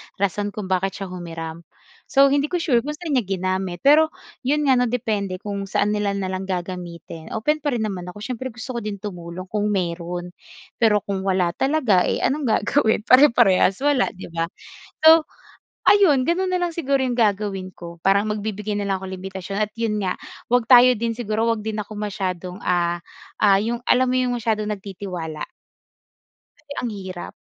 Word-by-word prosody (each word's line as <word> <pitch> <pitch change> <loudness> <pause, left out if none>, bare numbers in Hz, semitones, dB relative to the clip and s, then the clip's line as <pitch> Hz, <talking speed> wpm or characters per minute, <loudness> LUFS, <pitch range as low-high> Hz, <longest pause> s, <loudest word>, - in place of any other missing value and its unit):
rason 205 +1 -1
kung 195 -3 -5
bakit 190 +1 0
siya 185 - -7
humiram. 165 -2 -6 0.5
So, 275 -1 +5
hindi 285 +1 +2
ko 350 +1 -2
sure 250 -8 +3
kung 295 +5 -4
saan 320 -1 -6
niya 250 -7 +1
ginamit. 185 -1 -2
Pero, 300 +3 +6 0.3
'yon 295 +3 0
nga, 255 - +4
'no, 250 - +2
depende 215 -6 -1
kung 200 +1 -5
saan 200 +1 +1
nila 205 -1 0
nalang 190 -1 -3
gagamitin. 175 -3 -6
Open 300 +8 +1
pa 290 -3 -1
rin 225 - -1
naman 190 -4 -4
ako 205 +4 -8
siyempre, 255 +1 -4
gusto 245 +2 -6
ko 240 - -3
din 210 -2 -4
tumulong 180 -2 -7
kung 210 0 0
meron. 175 -2 -2 0.5
Pero 210 -4 +3
kung 195 -1 -3
wala 185 -2 +2
talaga 255 - +2
eh - - -1
anong 285 0 0
gagawin 220 0 +2
pareparehas 235 -5 +5
wala, 285 -3 +3
'di 185 - -10
ba? 165 0 -1 0.6
So, 320 0 +8 0.6
ayun, 330 -11 +5
gano'n 365 +3 +1
na 360 - +1
lang 350 - 0
siguro 275 -4 +1
yung 250 -2 -1
gagawin 200 -4 0
ko 170 0 -10
parang 200 +2 +3
magbibigay 210 0 -3
nalang 200 -2 -1
ako 190 - -6
limitasyon 190 +1 -6
at, 210 - -19
yun 225 -2 -1
nga, 190 -3 -1 0.3
huwag 245 -1 +1
tayo 250 0 +8
din 230 0 -3
siguro 225 -1 0
'wag 220 -2 -1
din 215 -1 -2
ako 210 0 -9
masyadong, 190 -3 -4
ah, 175 -1 0 0.4
ah, 200 -2 +6
yung 235 +3 -2
alam 255 +1 +5
mo 255 0 0
yung 250 -1 +1
masyadong 215 -2 -1
nagtitiwala? 185 -6 -6 1.3
Kasi 285 - -6
ang 245 - -2
hirap 190 -4 -7
210 Hz, 180 wpm, -22 LUFS, 185-245 Hz, 1.3 s, So